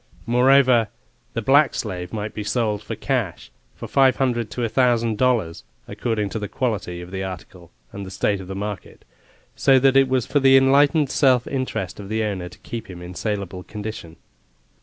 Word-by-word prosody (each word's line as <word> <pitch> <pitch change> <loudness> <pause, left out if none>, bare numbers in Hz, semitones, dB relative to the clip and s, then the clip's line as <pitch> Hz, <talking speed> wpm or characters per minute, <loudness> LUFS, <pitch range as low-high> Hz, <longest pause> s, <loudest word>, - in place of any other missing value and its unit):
Moreover, 125 -1 +4 0.5
the 115 - -3
black 140 +5 +4
slave 90 -4 -4
might 105 -1 -4
be 105 - -5
sold 105 -2 -1
for 115 - -6
cash, 110 - -3 0.2
for - - -8
five 135 -2 +4
hundred 120 -5 -1
to 120 +2 -4
a - - +1
thousand 115 -2 +1
dollars, 120 -10 +1 0.2
according 110 -4 -2
to 110 - -4
the 105 - -4
quality 100 -8 -3
of 90 +1 -10
the 95 0 -4
article 90 -2 -9 0.2
and 100 - -7
the 95 - -8
state 95 +1 -1
of 95 - -10
the 95 - -6
market, 105 0 -6 0.5
so 135 -1 +4
that 135 +1 +4
it 135 -1 +5
was 130 -3 +1
for 145 - +1
the 135 -1 +6
enlightened 140 +2 +4
self 130 -3 +3
interest 130 -10 -4
of 100 -1 -8
the 110 +1 -1
owner 95 -4 -3
to - - -16
keep 115 -3 -8
him 90 -1 -9
in 90 +1 -9
saleable 100 -2 -4
condition. 105 -5 -8
110 Hz, 190 wpm, -22 LUFS, 95-130 Hz, 0.5 s, the